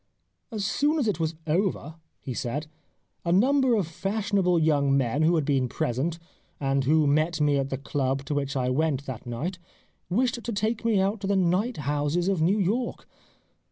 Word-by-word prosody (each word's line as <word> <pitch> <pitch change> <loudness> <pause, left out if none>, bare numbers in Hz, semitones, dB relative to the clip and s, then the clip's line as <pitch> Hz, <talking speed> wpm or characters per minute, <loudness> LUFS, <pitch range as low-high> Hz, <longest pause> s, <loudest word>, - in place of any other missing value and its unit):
" - - -51
As 210 -3 -3
soon 290 +9 +1
as 270 -7 +1
it 200 -6 0
was 160 0 -1
over/' 165 -2 0 0.3
he 130 - -5
said, 135 +4 -3 0.3
" - - -47
a 170 - 0
number 260 +6 +4
of 205 -5 +1
fashionable 195 +1 0
young 145 -4 +3
men 135 +2 0
who 165 +2 +4
had 155 -4 +1
been 135 -3 +1
present, 135 +10 -1 0.4
and 135 -1 0
who 155 +2 +4
met 155 +3 +2
me 145 -1 +3
at 135 0 -2
the 135 - -2
club 135 0 -2
to 145 - -2
which 140 -1 -2
I 130 -1 0
went 145 0 0
that 125 -2 -7
night, 160 +10 -4 0.5
wished 240 +5 0
to 235 - -3
take 220 +2 -1
me 225 -4 +2
out 195 +2 0
to 195 - -3
the 200 - +2
night 190 +6 +1
houses 145 +5 0
of 190 -5 0
New 185 +6 +3
York. 220 +6 -1
160 Hz, 195 wpm, -26 LUFS, 140-200 Hz, 0.5 s, number